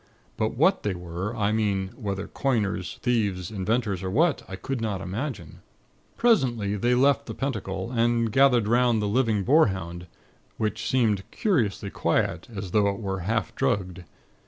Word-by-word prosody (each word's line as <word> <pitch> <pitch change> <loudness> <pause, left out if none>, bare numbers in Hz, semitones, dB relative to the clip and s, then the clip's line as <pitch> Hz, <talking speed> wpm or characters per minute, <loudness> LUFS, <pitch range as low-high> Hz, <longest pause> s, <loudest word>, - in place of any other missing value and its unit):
But 110 +1 -1
what 185 +7 +3
they 100 -3 -2
were, 90 +5 -5
I 105 -2 +1
mean 100 -3 0
whether 100 -3 -5
coiners, 105 - -1
thieves, 105 -7 0
inventors, 105 -1 -1
or 95 - -3
what, 155 - +2
I 95 - -6
could 120 +6 -4
not 105 -4 -2
imagine. 95 - -5 0.6
"Presently, 120 - +2
they 120 +5 +2
left 140 +2 +3
the - - -6
Pentacle, 105 -6 -3
and 115 -1 +1
gathered 125 -3 +4
'round 120 0 +3
the 105 - -1
living 110 -2 +1
boarhound, 95 - +1 0.5
which 110 -1 -2
seemed 110 -6 +2
curiously 110 - 0
quiet, - - 0
as 100 -4 -6
though 105 0 +3
it 100 - -3
were 95 -3 -3
half 110 +6 -1
drugged. 95 -9 -1
105 Hz, 155 wpm, -26 LUFS, 95-125 Hz, 0.6 s, gathered